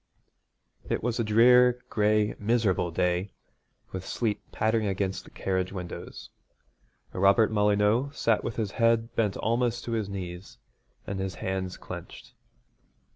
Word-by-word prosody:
It -, -, -1 dB
was 120 Hz, 0 st, -1 dB
a -, -, +2 dB
drear, 125 Hz, +3 st, +5 dB
gray, 105 Hz, -1 st, +2 dB
miserable 105 Hz, -5 st, +1 dB
day, 90 Hz, +3 st, -1 dB, 0.6 s
with 95 Hz, -1 st, -5 dB
sleet 110 Hz, +1 st, -2 dB
pattering 110 Hz, 0 st, +1 dB
against 95 Hz, -1 st, -2 dB
the -, -, -13 dB
carriage 95 Hz, -1 st, -2 dB
windows. 90 Hz, -3 st, -8 dB, 0.8 s
Robert 100 Hz, +4 st, +4 dB
Molyneux 105 Hz, +4 st, +2 dB
sat 115 Hz, -5 st, +1 dB
with 115 Hz, -, -4 dB
his 105 Hz, -4 st, -2 dB
head 115 Hz, 0 st, +2 dB
bent 105 Hz, -4 st, +1 dB
almost 120 Hz, +1 st, 0 dB
to 120 Hz, -, -5 dB
his 110 Hz, -3 st, -1 dB
knees, 90 Hz, -1 st, -7 dB, 0.5 s
and 100 Hz, -1 st, -4 dB
his 95 Hz, -1 st, -3 dB
hands 95 Hz, -1 st, -3 dB
clenched. -, -, -9 dB
105 Hz, 130 wpm, -27 LUFS, 95-115 Hz, 0.8 s, drear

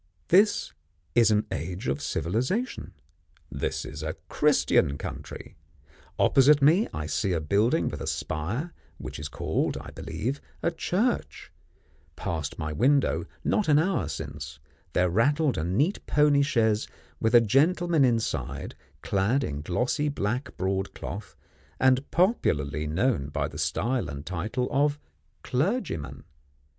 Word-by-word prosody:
This 200 Hz, +4 st, +4 dB, 0.4 s
is 115 Hz, +2 st, +5 dB
an 105 Hz, -1 st, +2 dB
age 90 Hz, +2 st, -4 dB
of 70 Hz, +3 st, -1 dB
civilisation; 125 Hz, -, -2 dB, 0.6 s
this -, -, -3 dB
is -, -, -7 dB
a -, -, -3 dB
Christian 70 Hz, 0 st, +3 dB
country; -, -, -8 dB, 0.6 s
opposite 140 Hz, +2 st, +5 dB
me 160 Hz, +10 st, +4 dB
I 75 Hz, -, -4 dB
see 90 Hz, +4 st, 0 dB
a 85 Hz, -, +1 dB
building 105 Hz, -, +2 dB
with 75 Hz, -, -4 dB
a -, -, -4 dB
spire, 105 Hz, -, -3 dB, 0.2 s
which -, -, -7 dB
is 75 Hz, -, -4 dB
called, -, -, -1 dB
I -, -, -8 dB
believe, 135 Hz, +6 st, -4 dB, 0.2 s
a 170 Hz, -, +2 dB
church; 180 Hz, -, -1 dB, 0.6 s
past 80 Hz, -3 st, -4 dB
my 75 Hz, -1 st, -3 dB
window, 125 Hz, -, +2 dB, 0.2 s
not 210 Hz, -, +1 dB
an 150 Hz, -2 st, +5 dB
hour 165 Hz, -, +1 dB
since, 70 Hz, 0 st, -6 dB, 0.4 s
there 90 Hz, -, +3 dB
rattled 140 Hz, -, +2 dB
a 80 Hz, -, -2 dB
neat 130 Hz, -, 0 dB
pony 150 Hz, -1 st, +4 dB
chaise 115 Hz, -7 st, +2 dB, 0.3 s
with 110 Hz, +2 st, +2 dB
a -, -, +10 dB
gentleman 155 Hz, -, +3 dB
inside 115 Hz, -3 st, -1 dB, 0.3 s
clad 105 Hz, +8 st, +1 dB
in 75 Hz, -8 st, -3 dB
glossy 125 Hz, -, 0 dB
black 125 Hz, 0 st, -3 dB
broad 95 Hz, +1 st, -2 dB
cloth, 100 Hz, +1 st, -7 dB, 0.4 s
and 130 Hz, +1 st, +3 dB
popularly 75 Hz, -, +1 dB
known 90 Hz, -, 0 dB
by 75 Hz, -, -2 dB
the -, -, -9 dB
style 125 Hz, +1 st, 0 dB
and 70 Hz, 0 st, -7 dB
title 105 Hz, +8 st, -2 dB
of 145 Hz, +2 st, +2 dB, 0.5 s
clergyman. 145 Hz, -, -2 dB
115 Hz, 135 wpm, -27 LUFS, -, 0.6 s, a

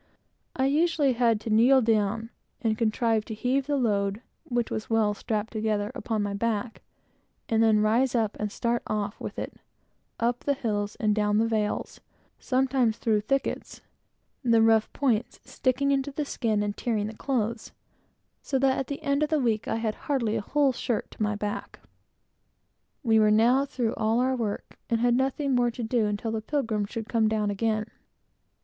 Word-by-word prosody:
I 265 Hz, -, +1 dB
usually 295 Hz, -1 st, +2 dB
had 230 Hz, -2 st, +2 dB
to 220 Hz, -, -4 dB
kneel 245 Hz, +5 st, +6 dB
down 220 Hz, -1 st, 0 dB, 0.3 s
and 225 Hz, -2 st, 0 dB
contrive 225 Hz, 0 st, +1 dB
to 220 Hz, -, -6 dB
heave 260 Hz, +5 st, 0 dB
the 290 Hz, -1 st, +1 dB
load, 205 Hz, -3 st, 0 dB, 0.2 s
which 240 Hz, -2 st, -1 dB
was 215 Hz, -, -4 dB
well 220 Hz, -2 st, +2 dB
strapped 215 Hz, +1 st, -3 dB
together, 215 Hz, -1 st, -1 dB
upon 225 Hz, -5 st, -2 dB
my 205 Hz, 0 st, -2 dB
back, 225 Hz, +2 st, -2 dB, 0.7 s
and 225 Hz, 0 st, +2 dB
then 220 Hz, -2 st, +4 dB
rise 235 Hz, +5 st, +2 dB
up 220 Hz, -3 st, +1 dB
and 210 Hz, -1 st, -2 dB
start 235 Hz, +2 st, -1 dB
off 210 Hz, -1 st, -3 dB
with -, -, -6 dB
it -, -, -4 dB, 0.7 s
up 235 Hz, +1 st, +1 dB
the 285 Hz, -, 0 dB
hills 205 Hz, -5 st, -2 dB
and 215 Hz, -2 st, +1 dB
down 210 Hz, 0 st, +1 dB
the 225 Hz, -, +3 dB
vales, 215 Hz, -2 st, -2 dB, 0.4 s
sometimes 255 Hz, -3 st, +1 dB
through 215 Hz, -2 st, +1 dB
thickets, 275 Hz, +6 st, -2 dB, 0.6 s
the 230 Hz, -2 st, +4 dB
rough 225 Hz, -1 st, +3 dB
points 245 Hz, -5 st, 0 dB
sticking 275 Hz, +2 st, 0 dB
into 275 Hz, 0 st, +1 dB
the 290 Hz, +2 st, -3 dB
skin, 220 Hz, -6 st, 0 dB
and 205 Hz, 0 st, -2 dB
tearing 220 Hz, -4 st, -1 dB
the 215 Hz, -, -5 dB
clothes, 230 Hz, -3 st, -2 dB, 0.7 s
so 270 Hz, -, -1 dB
that, 265 Hz, 0 st, +2 dB
at 270 Hz, -, -3 dB
the 285 Hz, +2 st, -6 dB
end 280 Hz, 0 st, +1 dB
of 305 Hz, -, +1 dB
the 310 Hz, -, +2 dB
week, 225 Hz, -5 st, 0 dB
I -, -, 0 dB
had 225 Hz, -1 st, -1 dB
hardly 235 Hz, -6 st, -1 dB
a 220 Hz, -, -1 dB
whole 280 Hz, +5 st, +2 dB
shirt 235 Hz, -2 st, -2 dB
to -, -, -12 dB
my 210 Hz, 0 st, +1 dB
back. 205 Hz, 0 st, -5 dB, 1.2 s
We 225 Hz, -3 st, +4 dB
were 215 Hz, 0 st, +5 dB
now 240 Hz, +6 st, +4 dB
through 240 Hz, -4 st, -1 dB
all 220 Hz, +2 st, +1 dB
our 260 Hz, +1 st, +2 dB
work, 220 Hz, -5 st, -4 dB
and 230 Hz, -1 st, +1 dB
had 240 Hz, +1 st, +3 dB
nothing 270 Hz, +2 st, 0 dB
more 245 Hz, -1 st, +3 dB
to 235 Hz, +1 st, -6 dB
do 225 Hz, -1 st, +1 dB
until 210 Hz, +2 st, -2 dB
the 220 Hz, -1 st, -2 dB
Pilgrim 225 Hz, -5 st, -1 dB
should 225 Hz, 0 st, -6 dB
come 225 Hz, -2 st, +2 dB
down 215 Hz, -1 st, 0 dB
again. 215 Hz, +1 st, 0 dB
225 Hz, 180 wpm, -27 LUFS, 215-255 Hz, 1.2 s, kneel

